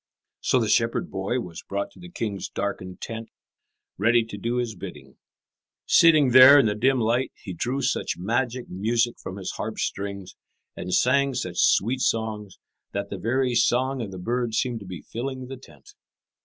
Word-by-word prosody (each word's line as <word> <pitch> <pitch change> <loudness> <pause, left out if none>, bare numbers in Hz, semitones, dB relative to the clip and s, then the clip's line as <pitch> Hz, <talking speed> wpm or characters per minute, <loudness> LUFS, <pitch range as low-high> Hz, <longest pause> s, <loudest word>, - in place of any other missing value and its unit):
So - - +2
the - - 0
shepherd - - +1
boy 100 +7 -2
was 85 -6 -8
brought 100 0 -4
to - - -18
the 175 - -11
king's 105 - -4
darkened 95 -2 -5
tent, 115 0 -6 0.7
ready 115 +3 +4
to 110 - -8
do 115 +4 -2
his 120 -2 -1
bidding. - - -10 0.7
Sitting 155 -6 +5
there 130 +3 +10
in 140 - +5
the 105 - +1
dim 130 +5 +2
light, 120 +3 +1
he 95 - -8
drew 125 +10 -2
such 130 - -1
magic 120 +6 -1
music 115 +5 0
from 95 - -7
his 95 -2 -5
harp's - - -3
strings, 100 -1 -5 0.4
and 90 - -6
sang 135 +5 +3
such - - -4
sweet 120 +7 +3
songs, 110 -4 -2 0.4
that 100 0 -4
the 100 - -5
very 125 +5 0
song 125 +3 +2
of 110 - -4
the 95 - -8
birds 120 +4 -2
seemed 125 -3 -1
to 100 - -11
be 90 -5 -8
filling 130 +2 -5
the 135 - -7
tent. 410 - -17
115 Hz, 180 wpm, -25 LUFS, 100-130 Hz, 0.7 s, there